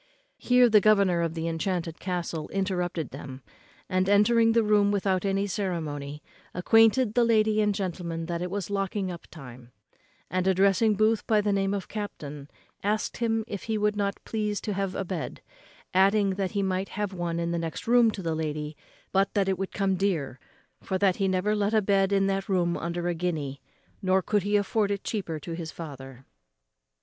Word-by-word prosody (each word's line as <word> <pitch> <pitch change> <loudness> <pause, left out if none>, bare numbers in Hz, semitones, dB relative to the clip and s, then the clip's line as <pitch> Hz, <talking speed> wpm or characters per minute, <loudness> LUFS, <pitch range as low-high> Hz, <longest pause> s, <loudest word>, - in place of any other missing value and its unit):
Here 250 0 +5
the 215 -3 +5
governor 200 -4 +4
of 165 -1 -2
the 165 0 -2
enchanted 165 0 -2
castle 175 -4 -3
interrupted 180 -6 -2
them, 135 -1 -9 0.4
and, 185 0 +1
entering 225 +3 +4
the 230 0 +4
room 210 -1 +3
without 195 -2 0
any 195 0 +1
ceremony, 155 -7 -4 0.3
acquainted 225 +5 +4
the 245 - +4
lady 215 -2 +3
and 210 -1 +1
gentleman 170 -4 -3
that 170 0 -3
it 180 - -2
was 200 0 -4
locking 195 -1 -1
up 170 - -9
time; 125 -5 -12 0.6
and, 185 0 -1
addressing 195 +3 +3
Booth 215 +2 +2
by 215 -2 +4
the 205 -1 +1
name 195 0 +1
of 195 - -5
captain, 150 -9 -6 0.3
asked 210 +2 -1
him 225 -1 0
if 205 -4 -6
he 220 -1 -1
would 210 0 +1
not 200 -1 -1
please 210 -2 -2
to 210 - -3
have 195 -1 -2
a 195 - -2
bed; 175 -3 -5 0.5
adding, 195 +2 +4
that 190 -1 -2
he 200 -1 0
might 190 0 -1
have 205 -2 -3
one 170 -2 -2
in 170 0 -1
the 170 - -1
next 165 -1 -5
room 240 0 +5
to 200 -3 -5
the 165 -1 -1
lady, 150 -1 -3 0.4
but 195 +1 +2
that 200 -2 +2
it 190 -1 0
would 195 - -3
come 195 -2 0
dear; 160 -10 -1 0.4
for 190 - -2
that 190 -1 +2
he 195 - +1
never 190 +3 +1
let 210 +1 +1
a - - +6
bed 195 -1 +2
in 195 -1 +3
that 195 +1 -1
room 175 -3 +1
under 170 +1 -3
a 175 - +1
guinea, 160 -5 -3 0.4
nor 190 0 +2
could 210 -1 +1
he 205 +2 +2
afford 205 +1 0
it 200 -1 -2
cheaper 180 -8 -3
to 165 +3 -7
his 165 -1 -5
father. 135 -5 -9
195 Hz, 195 wpm, -27 LUFS, 170-205 Hz, 0.6 s, a